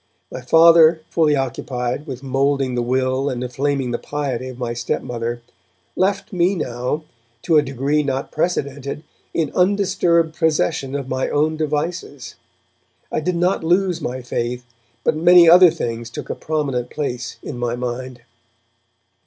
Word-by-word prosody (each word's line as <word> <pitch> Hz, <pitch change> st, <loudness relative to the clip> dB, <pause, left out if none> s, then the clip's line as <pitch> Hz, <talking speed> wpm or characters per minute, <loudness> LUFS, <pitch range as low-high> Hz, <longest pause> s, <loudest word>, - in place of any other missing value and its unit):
My 130 Hz, -, -6 dB
Father, 165 Hz, +3 st, +6 dB
fully 155 Hz, -3 st, +3 dB
occupied 130 Hz, +1 st, -3 dB
with 130 Hz, -1 st, -7 dB
moulding 135 Hz, 0 st, 0 dB
the 120 Hz, -, 0 dB
will 130 Hz, +2 st, 0 dB
and 125 Hz, -1 st, -3 dB
inflaming 135 Hz, +1 st, -1 dB
the 120 Hz, -, -2 dB
piety 135 Hz, -4 st, -3 dB
of 130 Hz, -, -9 dB
my 120 Hz, -2 st, -3 dB
stepmother, 120 Hz, 0 st, -3 dB, 0.5 s
left 195 Hz, +1 st, 0 dB
me 180 Hz, +2 st, +2 dB
now, 125 Hz, 0 st, -3 dB, 0.4 s
to 160 Hz, -2 st, +4 dB
a -, -, +4 dB
degree 140 Hz, +2 st, 0 dB
not 135 Hz, -1 st, -3 dB
precedented, 145 Hz, -3 st, -2 dB, 0.3 s
in 160 Hz, -3 st, -1 dB
undisturbed 180 Hz, -4 st, +2 dB
possession 150 Hz, -4 st, 0 dB
of 140 Hz, -2 st, -4 dB
my 130 Hz, 0 st, -1 dB
own 155 Hz, +2 st, +1 dB
devices. 150 Hz, -2 st, -3 dB, 0.8 s
I -, -, 0 dB
did 175 Hz, +3 st, -1 dB
not 180 Hz, +1 st, +1 dB
lose 180 Hz, +1 st, +1 dB
my 130 Hz, +1 st, -4 dB
faith, 120 Hz, 0 st, -3 dB, 0.4 s
but -, -, +2 dB
many 175 Hz, +2 st, +7 dB
other 180 Hz, +2 st, +9 dB
things 120 Hz, -7 st, -4 dB
took -, -, -6 dB
a -, -, -3 dB
prominent 140 Hz, -6 st, -2 dB
place 125 Hz, -5 st, -4 dB
in 120 Hz, -, -6 dB
my 120 Hz, -1 st, -1 dB
mind. 125 Hz, 0 st, -5 dB
140 Hz, 145 wpm, -20 LUFS, 125-160 Hz, 0.8 s, other